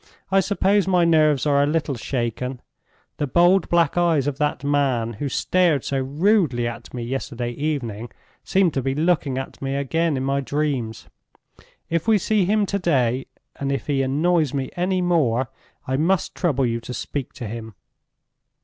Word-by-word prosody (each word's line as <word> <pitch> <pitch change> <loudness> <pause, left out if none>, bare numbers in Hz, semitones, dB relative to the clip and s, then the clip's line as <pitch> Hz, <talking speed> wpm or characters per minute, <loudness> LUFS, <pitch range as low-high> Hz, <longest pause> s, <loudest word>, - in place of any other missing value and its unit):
"I 195 - +5
suppose 200 0 +2
my 180 -2 +3
nerves 155 -4 +3
are 140 -1 +3
a 145 - +2
little 150 -1 0
shaken. 125 +1 -3 0.6
The 145 - -1
bold 175 +5 +4
black 170 -1 +2
eyes 165 -6 +2
of 145 -2 -3
that 150 -2 -1
man 135 -5 +1
who 140 +7 -4
stared 170 -1 +1
so 135 - -1
rudely 145 - +1
at 120 0 -7
me 120 -2 -5
yesterday 120 -1 -3
evening 120 -5 -3 0.3
seemed 190 -4 +2
to 135 - 0
be 135 +1 -1
looking 150 -4 +1
at 135 - -6
me 135 0 -2
again 150 +2 0
in 130 - -2
my 135 +1 0
dreams. 135 -6 -2 0.8
If 170 +4 -1
we 220 -1 +5
see 205 0 +1
him 210 +2 +2
to 200 +1 -2
day, 130 -8 +1 0.3
and 140 0 -2
if 135 - -2
he 140 -2 0
annoys 150 +2 +1
me 135 -1 -2
any 180 +1 0
more, 130 -8 +1 0.4
I 130 +1 0
must 170 +3 +1
trouble 140 -7 0
you 115 -1 -1
to 125 +2 -7
speak 140 -3 -5
to 125 - -7
him. 110 -1 -7
145 Hz, 175 wpm, -22 LUFS, 130-170 Hz, 0.8 s, I